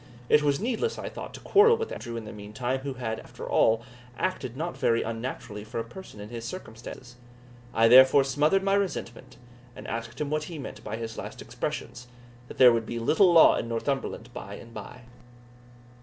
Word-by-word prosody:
It 150 - +6
was 145 -1 +1
needless, 250 - -1
I - - -5
thought, - - -8
to - - -9
quarrel 450 +3 +5
with 455 0 -4
Andrew 120 -1 -6
in 115 - -6
the 110 - -8
meantime, 110 +5 -3
who 135 0 -5
had, 110 -3 -3
after - - -10
all, 115 +1 +3 0.3
acted 130 -9 -2
not 170 +3 -3
very 115 0 +2
unnaturally 115 -2 -5
for 110 +2 -5
a - - -1
person 120 - -11
in 105 +1 -8
his 115 -1 -6
circumstances. 120 -4 -9 0.5
I 115 0 +4
therefore 130 +3 +8
smothered 150 +8 +2
my 195 0 +2
resentment, 190 -12 -3 0.4
and - - -9
asked 115 +2 -5
him 150 -1 -2
what 155 0 -1
he 165 -1 -7
meant 140 - -8
by 105 - -4
his 115 0 -6
last - - -7
expressions, 125 +1 -5 0.4
that - - -11
there 125 -2 +8
would 115 -1 -1
be 120 - -4
little 160 - +4
law 165 -2 +8
in - - -3
Northumberland 135 +4 -3
by - - -7
and 115 0 -12
by? 125 +2 -9
125 Hz, 195 wpm, -27 LUFS, 115-150 Hz, 0.5 s, therefore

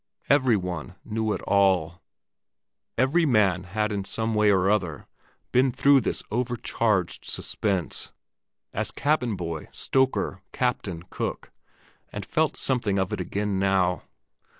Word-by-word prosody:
Every 130 -5 +4
one 90 -2 -5
knew 110 0 -1
it - - -5
all; 90 -4 +2 1.0
every 135 +8 +3
man 100 - +3
had 105 +4 -1
in 100 -1 -2
some 110 +3 -2
way 105 -1 +4
or 95 -2 +3
other 90 -8 0 0.5
been 130 +1 +4
through 140 +2 +5
this - - -2
overcharged 115 -5 0
suspense—as 95 -5 -4
cabin 135 -7 0
boy, 85 -3 -5
stoker, 130 -7 0
captain, 100 -9 -1
cook—and - - -8
felt - - 0
something 120 -7 0
of 95 -1 0
it - - -2
again 100 +1 -1
now. 95 -2 +2
105 Hz, 120 wpm, -26 LUFS, 95-120 Hz, 1.0 s, through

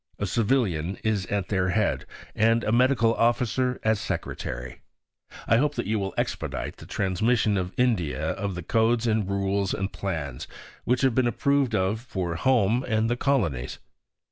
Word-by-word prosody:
A 105 - -2
Civilian 100 - 0
is 105 -4 0
at 100 -3 -2
their 95 -2 +1
head, 105 +2 0 0.3
and 115 +1 +3
a - - 0
Medical 120 -1 +3
Officer 125 +2 +1
as 110 -1 +2
Secretary. 60 -8 -5 0.6
I 115 - +4
hope 145 +3 +1
that - - -2
you 110 +2 0
will 95 -1 -4
expedite - - -3
the - - -12
transmission 105 +3 +1
to 90 -2 -1
India 85 -11 +1
of 100 -2 -3
the 90 - -5
codes 115 +3 +2
and 110 -4 +1
rules 100 0 0
and 95 +1 -3
plans 80 -10 -4 0.4
which 125 +1 +1
have 135 -3 +3
been 130 0 +2
approved 140 -1 +1
of 95 +2 +1
for 95 -8 -3
home 120 +4 +2
and 110 0 +1
the - - +2
colonies. 100 - 0
110 Hz, 165 wpm, -26 LUFS, 95-120 Hz, 0.6 s, I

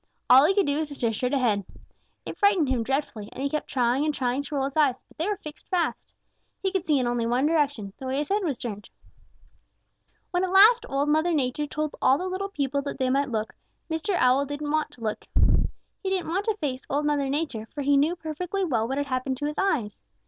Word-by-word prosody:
All 265 +3 +9
he 380 +5 +3
could 400 -3 +3
do 285 +1 0
was 315 - -1
to 285 - -8
stare 230 -4 0
straight 250 +5 -1
ahead. 225 -7 +1 0.6
It - - -6
frightened 390 -8 +3
him 255 -3 +1
dreadfully, 265 -4 -2
and 265 - -6
he 280 - -1
kept 305 - -2
trying 250 +1 +1
and 305 - +1
trying 255 -1 -1
to 290 +1 -6
roll 270 -1 +1
his 275 - -5
eyes, 285 -5 +2
but - - -23
they 330 - 0
were 415 - -1
fixed 305 -2 -11
fast. 360 -3 -1 0.5
He 385 - -1
could 380 -2 -2
see 300 -2 +4
in 255 - +1
only 240 -1 0
one 245 +4 +2
direction, 290 -11 0
the 265 - -6
way 260 +1 -1
his 295 0 -2
head 405 +1 +1
was 295 -8 -1
turned. 210 -4 -6 1.4
"When 355 0 +1
at 370 - -1
last 445 +5 +7
Old 280 +1 0
Mother 315 +3 +2
Nature 290 0 0
told 305 0 -3
all 260 +1 +5
the 365 - -4
little 380 +2 -3
people 280 -5 -1
that 280 - -5
they 260 -1 +1
might 275 +1 +1
look, 220 -2 -2 0.4
Mr. 320 +5 -1
Owl 265 -1 +3
didn't 290 +1 -4
want 310 0 +1
to 240 - -17
look. 215 -2 -3 0.8
He 385 - -2
didn't 370 -4 -1
want 385 +5 -1
to 440 -2 0
face 270 -7 -3
Old 290 +2 0
Mother 290 -2 +1
Nature, 270 -7 -2
for 285 +5 -6
he 285 +1 +3
knew 300 +5 +3
perfectly 360 +4 -3
well 230 -8 0
what 270 +2 -2
had 285 - 0
happened 260 -1 -2
to 290 - -3
his 295 0 -3
eyes. 275 - 0
285 Hz, 240 wpm, -26 LUFS, 255-325 Hz, 1.4 s, All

